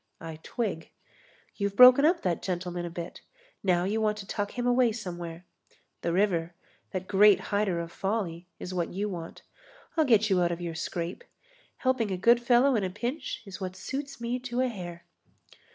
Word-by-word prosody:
I 160 -1 -8
twig. 200 -8 -3 0.7
You've 200 -1 -1
broken 250 +4 +9
up 340 +2 +3
that 175 -3 0
gentleman 175 -1 -3
a - - -5
bit; 170 0 -7 0.4
now 180 -3 +2
you 210 +4 0
want 210 -1 +1
to 205 - -7
tuck 205 0 -3
him 245 - -1
away 245 -1 +4
somewhere. 175 -5 -6 0.6
The 170 - -1
river, 175 -3 +1 0.3
that 185 0 -4
great 205 +1 +6
hider 200 -4 +1
of 170 0 -5
folly, 185 -4 -3
is 185 - -6
what 175 -2 -1
you 200 +3 -2
want. 170 -3 -7 0.5
I'll 320 -2 +3
get 220 -5 +4
you 190 -3 +3
out 175 0 +2
of 170 - -3
your 170 -1 -4
scrape. 170 - -4 0.5
Helping 255 -5 +1
a 190 - -2
good 235 +6 +5
fellow 245 +2 +4
in 210 - +1
a 185 - -1
pinch 240 - -4
is 195 0 -9
what 185 -1 -4
suits 275 +7 -5
me 235 +2 -2
to 250 0 -2
a 255 - +2
hair." 175 -6 -8
195 Hz, 185 wpm, -28 LUFS, 175-235 Hz, 0.7 s, broken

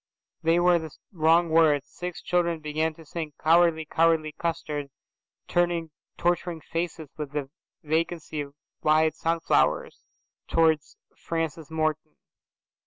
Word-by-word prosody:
They 165 +1 +3
were 175 0 +4
the 160 -1 -6 0.2
wrong 165 -1 +3
words. 155 -3 +4
Six 180 -1 -7
children 170 -2 +1
began 155 +1 -1
to 165 - -14
sing, 155 -1 -5
"Cowardy 165 0 +4
cowardy 160 -1 +2
custard," 155 -4 -3 0.6
turning 175 -2 0 0.3
torturing 175 -1 0
faces 165 -3 -4
with 150 -2 -5
the 140 -2 -3 0.3
vacancy 160 0 -1
of 140 0 -8 0.3
wide 155 +1 +3
sunflowers 165 - 0 0.4
towards 160 -3 +2 0.2
Francis 165 -2 -3
Morton. 155 -1 -2
160 Hz, 115 wpm, -26 LUFS, 155-170 Hz, 0.6 s, were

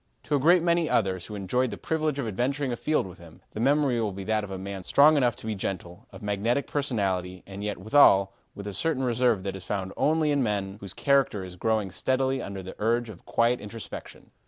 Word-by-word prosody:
To 150 - 0
a - - +2
great 170 +5 +5
many 170 -2 +2
others 95 -5 0
who 105 - -7
enjoyed 125 +6 0
the - - -6
privilege 155 -3 -1
of 135 -5 -2
adventuring 130 +6 -1
afield 150 +3 0
with 90 -1 -11
him, 85 -2 -15
the - - -7
memory 135 -1 +2
will 105 -2 -1
be 95 +1 -7
that 110 +1 0
of 105 - -6
a 95 - -5
man 95 0 -6
strong 150 - +6
enough 125 -4 +2
to - - -12
be 110 - -1
gentle, 95 -3 -5
of - - -12
magnetic 105 +7 0
personality, 95 -10 -1
and 100 +1 -8
yet 105 -1 -2
withal, 100 -2 +5 0.2
with 100 - -8
a 100 - -5
certain 150 +2 -1
reserve 120 -4 +2
that 95 -1 -3
is 95 - -8
found 95 -2 -3
only 155 0 +2
in 145 -1 +2
men 100 -4 -1
whose 100 -3 -8
character 135 -8 +2
is 90 -1 -9
growing 110 0 0
steadily 130 +8 0
under 100 -3 -6
the 95 - -8
urge 115 +2 +1
of 95 -5 -12
quiet 120 +1 +2
introspection. 105 +2 -9
110 Hz, 225 wpm, -27 LUFS, 95-135 Hz, 0.2 s, strong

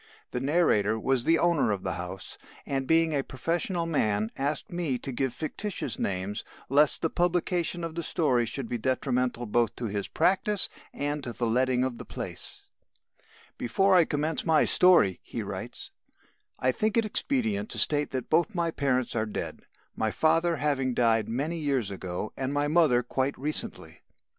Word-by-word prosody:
The 125 - -2
narrator 125 - +2
was 130 +1 +1
the 165 +1 +4
owner 170 -9 +2
of 100 -2 -2
the - - -1
house, 90 +1 -7 0.3
and, 135 -1 -2
being 165 -1 +3
a 140 -2 +1
professional 170 +6 -2
man, 110 -9 0
asked 140 +3 -2
me 170 -7 -1
to 135 - -5
give 130 +1 -1
fictitious 155 - -4
names, 95 +2 -2 0.3
lest 145 +2 +3
the 165 - +2
publication 175 -1 0
of 165 -1 -4
the 170 - -3
story 130 -9 +1
should 120 +2 -3
be 120 0 -3
detrimental 125 -1 0
both 115 0 +1
to 120 - -5
his 100 -2 -3
practice 195 +1 +2 0.2
and 145 0 -3
to 120 -3 -4
the 120 - -2
letting 125 +2 +2
of 130 -2 -3
the - - -7
place: - - -3 1.0
"Before 190 +12 +2
I 175 -3 +6
commence 150 +2 -1
my 160 -2 +4
story," 175 - +5
he - - -5
writes, - - -6 0.7
"I 130 - +2
think 215 - 0
it 230 - +3
expedient 215 -2 -1
to - - -5
state 145 -1 +2
that 130 -2 -4
both 175 +6 +2
my 170 -2 0
parents 130 -6 0
are 110 -1 0
dead, 105 - -5 0.4
my 110 - 0
father 165 +6 +2
having 135 -4 0
died 115 -2 +2
many 150 +8 -2
years 135 -9 0
ago 95 +1 -5
and 130 0 -2
my 145 +1 +1
mother 150 -6 +4
quite 130 +3 -1
recently. 150 +3 -4
140 Hz, 170 wpm, -28 LUFS, 120-165 Hz, 1.0 s, I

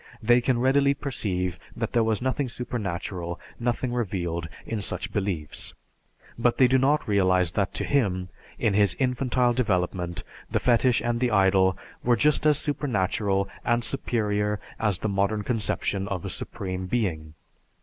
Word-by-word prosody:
They 120 +2 +4
can 125 0 +1
readily 140 +2 +3
perceive 90 - -2 0.2
that 115 -1 -3
there 120 -2 +4
was 110 +1 0
nothing 130 0 0
supernatural, 95 -7 -4 0.2
nothing 120 +1 -1
revealed, 85 -8 -2 0.2
in 110 -2 -3
such 90 -1 -4
beliefs; 95 -8 -3 0.6
but 120 0 +2
they 130 - +6
do 130 +1 +3
not 145 +3 +2
realize 95 -4 +3
that 95 +1 0
to - - 0
him, 95 -10 0 0.3
in 105 - +1
his 100 0 +3
infantile 125 -1 +1
development, 90 -6 -1 0.3
the - - +1
fetish 120 0 +3
and 120 0 0
the 125 0 +2
idol 95 -2 +4 0.3
were 120 0 +4
just 150 +5 +3
as 150 -2 +5
supernatural 100 -8 0 0.2
and 120 +1 +1
superior 105 -4 -1 0.2
as 105 -4 +1
the 110 - -2
modern 100 +1 0
conception 105 -3 -1
of 95 -4 -3
a - - -3
Supreme 95 -1 -5
Being. 85 -9 -2
105 Hz, 150 wpm, -26 LUFS, 95-125 Hz, 0.6 s, they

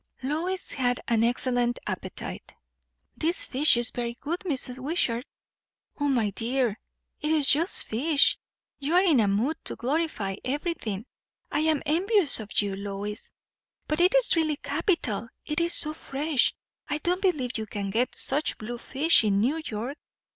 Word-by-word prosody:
Lois 335 +7 -2
had 245 -2 0
an 230 -1 +2
excellent 245 0 +1
appetite. - - -6 0.6
"This 330 +3 0
fish 275 -1 +6
is 240 -1 +2
very 235 -1 -3
good, 335 +5 -3
Mrs. 265 -7 -1
Wishart." 260 -4 -1 0.7
"O 290 - +1
my 235 -7 +1
dear, 235 0 -1 0.4
it 300 - -2
is 310 -2 +3
just 325 +6 +4
fish! 285 +6 +4 0.4
You 295 +4 -1
are 365 - +6
in 320 -9 +4
a 215 - +3
mood 225 +11 0
to - - -3
glorify 255 -8 -2
everything. 255 - -3 0.5
I - - +1
am 310 -2 +1
envious 360 - +2
of 210 -2 -8
you, 200 -1 -3
Lois." 200 +1 -5 0.6
"But 305 +2 -1
it 365 +7 +4
is - - +4
really 315 -2 +1
capital; 285 - -1 0.2
it 300 - -1
is 340 0 +1
so 305 -2 +1
fresh. 290 -2 0 0.4
I 295 - 0
don't 355 +4 -1
believe 270 - 0
you 220 - -4
can 200 -1 -4
get 240 +5 0
such 290 +3 0
blue 235 +2 -6
fish 295 +2 +3
in 200 -2 +2
New 280 +10 +1
York." 240 +4 -5
275 Hz, 160 wpm, -27 LUFS, 235-315 Hz, 0.7 s, fish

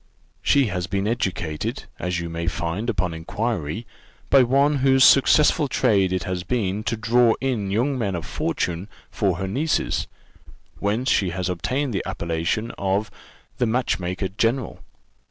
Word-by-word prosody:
She 140 -1 +3
has 90 -5 -3
been 100 +1 -1
educated, 90 -9 -2 0.2
as 90 0 -2
you 85 - -4
may 85 0 -4
find 85 +7 -2
upon 90 -6 -1
inquiry, 100 +3 -3 0.5
by 135 - +7
one, 140 +4 +3
whose 135 0 +4
successful 150 +3 +5
trade 105 -8 +2
it 95 -2 -1
has 90 -1 -3
been 105 0 -1
to 115 - -1
draw 115 +1 +3
in 120 -7 -1
young 125 +7 0
men 100 -5 -1
of 85 -2 -5
fortune 90 +3 -2 0.2
for 95 -5 0
her 95 - -3
nieces, 145 +11 0 0.7
whence 110 +6 -1
she 95 - +2
has 90 +1 -3
obtained 130 +9 -1
the 95 - 0
appellation 85 +7 -2
of 100 +2 0 0.5
the 125 - +2
match 125 -2 0
maker 90 +2 -2
general. 115 +6 -1
100 Hz, 155 wpm, -23 LUFS, 90-125 Hz, 0.7 s, by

